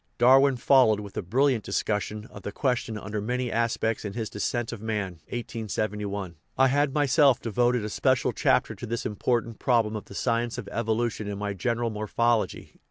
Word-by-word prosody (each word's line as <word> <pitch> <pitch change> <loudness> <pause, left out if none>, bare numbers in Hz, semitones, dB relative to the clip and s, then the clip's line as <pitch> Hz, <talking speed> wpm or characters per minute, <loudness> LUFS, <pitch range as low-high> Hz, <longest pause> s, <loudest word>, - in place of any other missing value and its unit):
Darwin 135 +2 +5
followed 125 -4 +4
with 100 -2 -9
a - - -1
brill 120 +10 +2
iant 130 -6 +2
discussion 105 +1 -2
of 100 - -10
the 100 - -5
question 120 -2 -1
under 105 +1 -4
many 125 +2 -2
aspects 115 -1 0
in 105 -2 -5
his 110 -1 -4
Descent 120 +3 -2
of 115 -4 -7
Man 105 -6 -3
(1871). 105 - -4 0.2
I 135 0 +5
had 145 +1 +2
myself 140 -2 +4
devoted 120 0 +1
a - - -3
special - - +1
chapter - - +2
to - - -8
Lhis 115 +1 -3
important 115 +2 -1
problem 115 -4 +2
of 105 - -5
the 100 - -12
science 120 +1 0
of 115 -5 -6
evolution 115 -1 -1
in 100 -1 -4
my 105 0 -3
General 115 +4 -1
Morphology 110 +2 0
(1866). - - -27
115 Hz, 185 wpm, -26 LUFS, 105-125 Hz, 0.2 s, Darwin